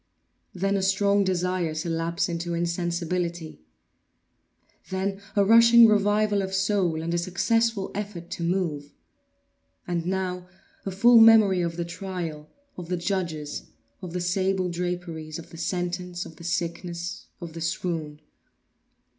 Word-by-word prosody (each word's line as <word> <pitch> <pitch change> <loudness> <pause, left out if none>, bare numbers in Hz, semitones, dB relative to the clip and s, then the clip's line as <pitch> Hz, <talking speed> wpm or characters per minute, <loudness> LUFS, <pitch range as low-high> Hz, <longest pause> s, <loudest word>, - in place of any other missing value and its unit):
Then 195 +2 0
a - - -1
strong 200 +1 +2
desire 180 -3 -1
to 155 +2 -3
lapse 165 +1 -1
into 170 0 -3
insensibility. 170 - -2 1.3
Then 195 +1 -2
a 200 -1 +4
rushing 230 +2 +8
revival 205 0 +2
of 190 0 -3
soul 190 -5 +1
and 170 +1 -2
a 175 - +1
successful 220 +4 0
effort 195 -4 -6
to - - -5
move. 170 -5 -2 0.9
And 175 -1 -2
now 180 -1 -2 0.4
a - - -1
full 235 +5 +6
memory 220 -5 +7
of 170 -1 -2
the 170 - -2
trial, 170 -4 -6 0.3
of 175 -2 -7
the 180 - 0
judges, 170 -5 -3 0.3
of 180 -3 -7
the 180 - -2
sable 185 +1 0
draperies, 170 -3 -4
of 170 - -11
the 165 - -10
sentence, 180 +1 -3
of 160 - -12
the - - -12
sickness, 170 0 -4
of 170 -3 -8
the 165 - -7
swoon. 160 -2 -3
180 Hz, 140 wpm, -26 LUFS, 170-195 Hz, 1.3 s, rushing